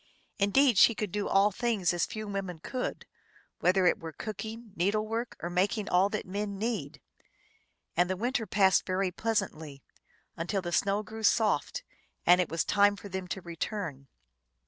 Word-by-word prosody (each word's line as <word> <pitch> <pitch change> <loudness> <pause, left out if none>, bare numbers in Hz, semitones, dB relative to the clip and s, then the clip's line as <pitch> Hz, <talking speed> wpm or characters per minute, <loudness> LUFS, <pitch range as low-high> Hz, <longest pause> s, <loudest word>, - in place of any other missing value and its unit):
Indeed, 230 +3 +4
she 230 - +7
could 210 -3 -3
do 205 +1 -2
all 200 +2 +4
things 210 -5 0
as 175 - 0
few 215 -1 -6
women 195 -3 -4
could, 250 +10 -4 0.5
whether 185 +1 +3
it 175 - +3
were 165 -1 -7
cooking, 220 +4 -7
needle 205 +5 +1
work, 230 +2 -3
or - - -1
making 200 +4 0
all 185 +3 +4
that 215 0 -3
men 200 +1 -4
need. 195 -10 -3 1.0
And 175 +1 +3
the 185 - -1
winter 240 +1 -1
passed 190 0 +4
very 185 0 0
pleas 220 +3 +1
antly, 155 -7 -9 0.5
until 185 +3 -2
the 175 - -3
snow 200 +3 +1
grew 220 +1 -8
soft, 220 - +2 0.4
and 180 +1 +6
it 180 - -2
was 165 +1 0
time 205 0 +4
for 200 - -10
them 190 -1 -4
to 190 +2 -4
return. 165 -5 -5
200 Hz, 170 wpm, -29 LUFS, 180-215 Hz, 1.0 s, she